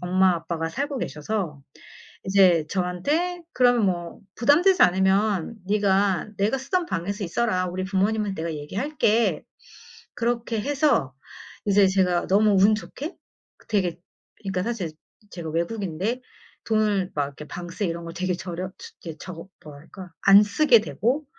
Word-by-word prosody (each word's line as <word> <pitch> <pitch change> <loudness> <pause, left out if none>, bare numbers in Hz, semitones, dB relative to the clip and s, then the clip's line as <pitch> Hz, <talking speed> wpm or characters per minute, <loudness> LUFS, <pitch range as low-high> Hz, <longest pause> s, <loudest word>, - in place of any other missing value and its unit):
엄마 185 +1 +3
아빠가 165 -1 -3
살고 280 - -3
계셔서 155 -5 -3 0.6
이제 185 -5 +4
저한테 290 - -1
"그럼 245 -4 +4
뭐 175 -2 -3 0.2
부담되지 340 - +4
않으면 190 +2 +2
네가 200 -2 +1
내가 210 +7 +1
쓰던 340 +7 -1
방에서 195 - -3
있어라. 185 0 0
우리 185 +1 -3
부모님은 200 +1 0
내가 165 -1 -4
얘기할게." 220 - 0 0.7
그렇게 235 -1 -1
해서 270 - +1 0.5
이제 200 -1 +5
제가 185 -2 +1
너무 210 +2 +4
운 210 +2 +6
좋게 290 - -7 0.5
되게 180 -5 0 0.4
그러니까 190 -2 -2
사실 205 -8 -3 0.4
제가 165 -3 -6
외국인데 195 +6 -2 0.4
돈을 210 -4 +1
막 145 - +1
이렇게 145 +2 -10
방세 175 +3 -5
이런 170 0 -4
걸 165 - -7
되게 185 0 -1
저렴 180 0 -5
트 - - -11
이제 160 -2 -8
저거 175 -1 -9 0.2
뭐랄까 160 +5 -11
안 200 +1 +8
쓰게 230 +2 +4
되고 235 - -1
195 Hz, 295 characters per minute, -24 LUFS, 175-225 Hz, 0.7 s, 안